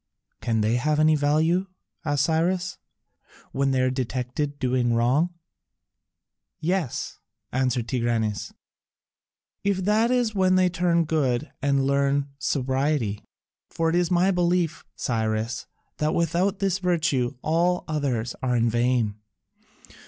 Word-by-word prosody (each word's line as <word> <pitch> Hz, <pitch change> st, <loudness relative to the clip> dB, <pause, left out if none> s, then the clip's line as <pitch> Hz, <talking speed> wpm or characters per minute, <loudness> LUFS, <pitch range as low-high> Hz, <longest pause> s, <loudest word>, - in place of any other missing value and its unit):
"Can 115 Hz, -2 st, 0 dB
they 110 Hz, +3 st, +2 dB
have 150 Hz, +4 st, +1 dB
any 155 Hz, 0 st, +5 dB
value," 160 Hz, +6 st, +2 dB, 0.4 s
asked 145 Hz, -3 st, +1 dB
Cyrus, 175 Hz, +4 st, 0 dB, 0.7 s
"when 135 Hz, 0 st, +1 dB
they 130 Hz, -1 st, +2 dB
are 130 Hz, 0 st, +2 dB
detected 130 Hz, +3 st, -3 dB
doing 125 Hz, -3 st, +1 dB
wrong?" 140 Hz, +9 st, +2 dB, 1.2 s
"Yes," 175 Hz, -5 st, -2 dB, 0.3 s
answered 125 Hz, -2 st, 0 dB
Tigranes, 115 Hz, -4 st, -1 dB, 1.1 s
"if 195 Hz, -2 st, 0 dB
that 215 Hz, +3 st, +3 dB
is 245 Hz, -3 st, +1 dB
when 185 Hz, -2 st, +3 dB
they 185 Hz, -1 st, +4 dB
turn 175 Hz, -1 st, +2 dB
to -, -, 0 dB
good 150 Hz, -3 st, 0 dB
and 140 Hz, -1 st, +2 dB
learn 140 Hz, 0 st, +1 dB
sobriety. 130 Hz, -5 st, 0 dB, 0.5 s
For 165 Hz, 0 st, 0 dB
it -, -, 0 dB
is 175 Hz, -1 st, +2 dB
my 180 Hz, +2 st, +3 dB
belief, 175 Hz, -2 st, 0 dB
Cyrus, 110 Hz, 0 st, -2 dB, 0.3 s
that 150 Hz, +1 st, 0 dB
without 175 Hz, +4 st, +1 dB
this 195 Hz, -1 st, 0 dB
virtue 155 Hz, -8 st, 0 dB
all 175 Hz, +3 st, +1 dB
others 130 Hz, -7 st, -1 dB
are 125 Hz, -1 st, 0 dB
in 115 Hz, -1 st, +2 dB
vain. 120 Hz, -3 st, +1 dB
145 Hz, 125 wpm, -25 LUFS, 125-175 Hz, 1.2 s, any